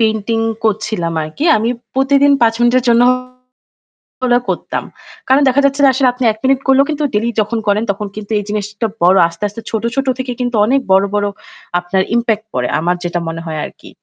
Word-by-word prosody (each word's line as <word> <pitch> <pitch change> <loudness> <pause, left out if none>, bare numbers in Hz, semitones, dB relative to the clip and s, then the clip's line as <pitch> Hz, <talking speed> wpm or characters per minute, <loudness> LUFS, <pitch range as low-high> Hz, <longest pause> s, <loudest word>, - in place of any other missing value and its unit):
Painting 220 0 0 0.3
করছিলাম 210 -5 -1
আর 155 - -5
কি 290 - -2
আমি 225 +2 0 0.3
প্রতিদিন 280 +1 +3
৫ 225 0 +4
মিনিটের 240 +1 +3
জন্য 235 0 +5 1.2
হলেও 245 -1 +2
করতাম। - - -3 0.4
কারণ 265 +2 +4
দেখা 265 +2 +3
যাচ্ছে 280 +1 +1
যে 275 - +7
আসলে 260 0 +2
আপনি 250 0 -5
১ 215 - -8
মিনিট 265 0 +3
করলেও 270 +1 +5
কিন্তু 300 -1 -2
ডেইলি 220 +3 +1
যখন 215 +2 -2
করেন 205 +2 +2
তখন 205 +1 -5
কিন্তু 215 0 -8
এই 205 - -4
জিনিসটা 210 +1 -3 0.2
বড় 185 +2 +5
আস্তে, 170 +4 -10
আস্তে 210 +3 -9
ছোট, 220 -1 -3
ছোট 270 0 -1
থেকে 255 -1 -3
কিন্তু 245 -1 -1
অনেক 270 +4 +2
বড়, 190 +1 +5
বড় 205 - +1 0.5
আপনার 175 +2 -1
impact 225 -2 0
পড়ে। 125 -1 -1
আমার 175 +2 0
যেটা 175 0 -2
মনে 165 0 -4
হয় 155 -1 -4
আর - - -8
কি। - - -13
225 Hz, 200 wpm, -16 LUFS, 200-255 Hz, 1.2 s, যে